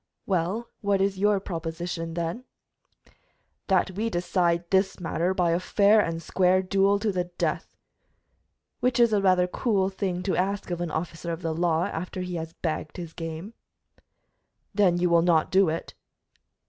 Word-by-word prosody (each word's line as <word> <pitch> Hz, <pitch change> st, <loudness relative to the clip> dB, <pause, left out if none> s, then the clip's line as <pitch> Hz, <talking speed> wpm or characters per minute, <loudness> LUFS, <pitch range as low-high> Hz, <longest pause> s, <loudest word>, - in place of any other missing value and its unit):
"Well, 190 Hz, +5 st, -1 dB
what 200 Hz, -1 st, +1 dB
is 195 Hz, 0 st, 0 dB
your 205 Hz, 0 st, +3 dB
proposition, 165 Hz, -1 st, -5 dB
then?" 170 Hz, +9 st, -3 dB, 1.2 s
"That 190 Hz, -1 st, +2 dB
we 215 Hz, +5 st, -2 dB
decide 175 Hz, -2 st, 0 dB
this 190 Hz, 0 st, +2 dB
matter 175 Hz, +1 st, -1 dB
by 180 Hz, -3 st, +1 dB
a 170 Hz, -, +2 dB
fair 205 Hz, +3 st, +4 dB
and 165 Hz, -3 st, -3 dB
square 185 Hz, 0 st, +2 dB
duel 195 Hz, +1 st, +3 dB
to 210 Hz, +1 st, 0 dB
the 180 Hz, -2 st, -1 dB
death." 175 Hz, 0 st, -3 dB, 1.0 s
"Which 250 Hz, 0 st, +1 dB
is 235 Hz, -2 st, +5 dB
a 205 Hz, -, +3 dB
rather 185 Hz, -2 st, +4 dB
cool 195 Hz, 0 st, 0 dB
thing 190 Hz, -2 st, -3 dB
to 190 Hz, -, 0 dB
ask 195 Hz, 0 st, -1 dB
of 175 Hz, 0 st, -2 dB
an 175 Hz, -, -2 dB
officer 165 Hz, +1 st, -4 dB
of 165 Hz, +2 st, -5 dB
the 165 Hz, -1 st, -1 dB
law, 165 Hz, 0 st, +1 dB
after 180 Hz, +3 st, -4 dB
he 180 Hz, 0 st, -4 dB
has 165 Hz, 0 st, -6 dB
bagged 155 Hz, -1 st, -4 dB
his 170 Hz, -2 st, -7 dB
game." 165 Hz, +5 st, -6 dB, 1.2 s
"Then 190 Hz, -4 st, +3 dB
you 180 Hz, 0 st, +2 dB
will 170 Hz, -1 st, +4 dB
not 165 Hz, -2 st, +2 dB
do 190 Hz, -2 st, +4 dB
it?" 165 Hz, +1 st, -4 dB
180 Hz, 165 wpm, -26 LUFS, 170-195 Hz, 1.2 s, is